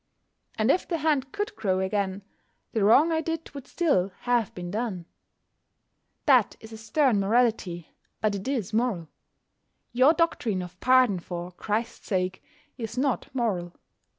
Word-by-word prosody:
And 220 +4 +3
if 365 - 0
the 340 - -1
hand 285 -4 0
could 415 +1 -3
grow 190 -3 0
again, 190 0 -1 0.5
the 220 - +1
wrong 275 +11 +6
I 320 0 +1
did 325 0 -4
would 280 -2 -9
still 285 - +1
have 240 -4 +1
been 175 -1 -6
done. 210 -5 -3 1.2
That 255 -8 +4
is 220 0 -12
a - - -7
stern 225 +1 +2
morality, 200 -5 +1 0.3
but 215 -1 +1
it 195 +2 -5
is 230 -7 -2
moral. 215 -9 0 0.8
Your 255 +6 +5
doctrine 230 - 0
of 180 0 -11
pardon 255 -6 +4
"for 175 0 -6
Christ's 215 +5 -3
sake" 185 -2 -1 0.4
is 230 +1 -5
not 265 -1 0
moral. 185 -8 -1
220 Hz, 150 wpm, -26 LUFS, 190-260 Hz, 1.2 s, wrong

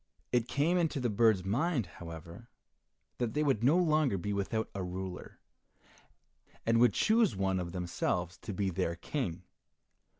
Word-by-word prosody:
It 120 -1 +2
came 165 +6 +2
into 160 -4 0
the 120 -3 0
bird's 105 -3 +3
mind, 130 - +1
however, 85 +5 -10 0.7
that 120 -3 -1
they 150 - +2
would 135 -7 +1
no 145 +8 +5
longer 155 - +3
be 105 +3 -3
without 100 +3 -1
a 100 - -4
ruler, 90 0 -6 1.3
and 115 0 +3
would 120 -3 +5
choose 220 - +3
one 95 -1 0
of 85 -1 -4
themselves 90 -1 -2
to 110 - -6
be 95 0 -1
their 85 0 -1
King. 90 - -3
105 Hz, 155 wpm, -32 LUFS, 90-135 Hz, 1.3 s, no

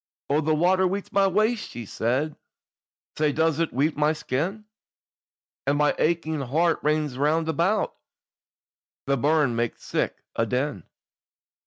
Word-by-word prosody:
"Oh, 150 +2 +3
the 155 0 +1
water 185 +4 +3
weets 195 +2 -4
my 195 -1 +4
waist," 215 +4 +1
she 120 -1 -7
said, 130 +9 -1 0.8
"Sae 150 -1 +3
does 160 +1 +1
it 165 - 0
weet 145 +5 +1
my 150 +1 +2
skin, 165 +9 -3 1.0
And 140 +1 +2
my 150 0 +3
aching 160 -1 0
heart 160 +6 +1
rins 150 -3 0
round 155 +3 +2
about, 175 +7 +1 1.1
The 140 - +2
burn 145 -2 +2
maks 115 -1 -2
sic - - -2
a 115 - +1
din. 125 - -2
155 Hz, 140 wpm, -25 LUFS, 140-170 Hz, 1.1 s, my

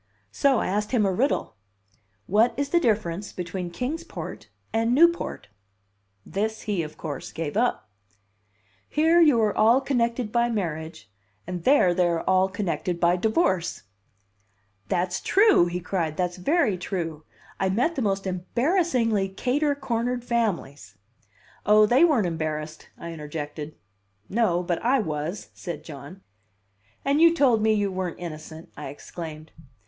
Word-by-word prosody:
So 275 -3 +3
I - - 0
asked 210 +2 -1
him 220 -5 +3
a 195 - +2
riddle. 225 - 0 0.7
"What 220 +5 +3
is 285 0 -1
the 345 - +3
difference 205 - -1
between 180 0 -5
Kings 265 - -4
Port - - -8 0.2
and 230 +2 +2
Newport?" 340 +3 +2 0.8
This 220 +3 -2
he, 205 -5 -1
of 155 -1 -7
course, 145 -4 -6
gave 160 -1 -4
up. 240 +3 0 1.0
"Here 325 +3 +4
you 295 -8 +5
are 210 - +1
all 230 +4 +5
connected 240 -4 -1
by 235 0 +2
marriage, 160 - -4 0.4
and 180 -1 -6
there 260 -10 +5
they 180 0 +2
are 170 -1 0
all 185 0 +3
connected 185 -3 -2
by 175 +1 +3
divorce." 190 - 0 1.1
"That's 180 +1 0
true!" 405 - +4
he 175 +1 -3
cried, 170 -4 -2
"that's 180 0 -1
very 225 - +1
true. 165 -4 -4 0.4
I 190 - +1
met 245 - +1
the 275 - -3
most 195 -3 0
embarrassingly 230 - 0
cater 280 +9 0
cornered 245 -2 -2
families." 170 - -2 0.7
"Oh, 210 +1 +6
they 245 +8 +4
weren't 290 - +4
embarrassed!" 155 -2 -4
I 170 0 -7
interjected. 150 0 -6 0.5
"No, 195 -5 +1
but 175 -1 -2
I 255 +4 +3
was," 160 - -4
said 170 -5 -7
John. 150 +5 -10 0.8
"And 280 +3 +2
you 335 0 +6
told 250 -8 +3
me 220 0 +3
you 205 -2 0
weren't 185 -2 -3
innocent!" 160 -1 -8
I 150 - -7
exclaimed. 155 +2 -8
195 Hz, 145 wpm, -25 LUFS, 170-240 Hz, 1.1 s, Oh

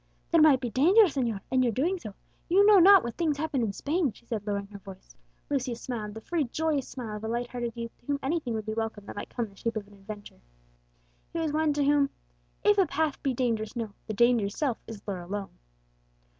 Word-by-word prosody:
"There 335 -1 +5
might 300 -4 +7
be 245 -3 -4
danger, 360 - +6
señor, 250 - 0
in 260 0 +3
your 245 -2 +2
doing 335 - 0
so; 215 -9 -9 0.3
you 390 +4 +5
know 415 -2 +8
not 390 +1 +8
what 235 - -4
things 315 -4 +1
happen 300 -3 -1
in 220 -3 0
Spain," 295 - 0
she 235 - -20
said, 220 -3 -4
lowering 200 -1 -1
her 200 -1 -10
voice. 190 -1 -13 0.3
Lucius 255 -4 -2
smiled, 220 -5 -5
the 220 - -7
free 325 +3 -1
joyous 295 +1 -1
smile 225 -5 -6
of 210 - -10
a - - -2
light 240 +1 -2
hearted 240 -2 -3
youth 230 -1 -6
to - - -30
whom 285 -1 0
anything 270 -5 -1
would 215 -1 -4
be 215 - -3
welcome 225 -2 -3
that - - -8
might - - -6
come 240 - -2
in 210 - -14
the 195 - -21
shape 230 +2 -2
of 210 - -4
adventure. 205 - -11 0.9
He - - -3
was 315 -2 -1
one 310 0 +2
to 290 0 +1
whom 285 0 +3 0.5
"If 415 -1 +4
a 380 - +4
path 300 0 -1
be 270 -3 0
dangerous 230 -3 -1
known, 225 -4 -4
The 215 - -3
danger's 230 -3 +3
self 270 -7 0
is 220 -3 -10
lure 195 -3 -3
alone." 195 - -6
245 Hz, 235 wpm, -28 LUFS, 215-300 Hz, 0.9 s, know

